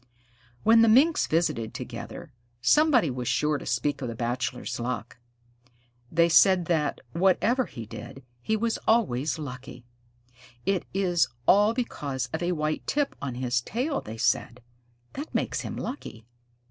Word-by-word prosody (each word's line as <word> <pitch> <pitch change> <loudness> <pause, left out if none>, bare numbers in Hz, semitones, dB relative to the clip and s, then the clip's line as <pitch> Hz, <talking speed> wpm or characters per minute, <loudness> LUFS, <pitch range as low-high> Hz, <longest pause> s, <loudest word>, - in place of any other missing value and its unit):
When 225 +1 +6
the 230 - +6
Minks 275 +9 +4
visited 135 -9 0
together, 125 +4 -8 0.3
somebody 250 - +4
was 125 -1 -4
sure 150 -1 +1
to - - -9
speak 135 +4 -1
of 130 - -3
the 115 - -5
Bachelor's 120 +2 -3
luck. 120 -1 -4 0.9
They 170 +1 +4
said 180 +1 +5
that, 160 -3 0
whatever 195 - +2
he 115 - -8
did, 135 +4 -10 0.2
he 220 - 0
was 230 +1 -1
always 160 - +2
lucky. 130 -4 -8 0.8
"It 195 -1 0
is 175 -7 +2 0.2
all 205 +3 +5
because 140 - -3
of 160 - -2
a 175 +1 0
white 155 -1 -2
tip 290 -1 0
on 135 -3 -4
his 125 -1 0
tail," 260 - -2
they 110 +1 -8
said. 125 0 0 0.5
"That 290 +3 -7
makes - - -1
him - - -5
lucky." 115 - -6
155 Hz, 145 wpm, -27 LUFS, -, 0.9 s, When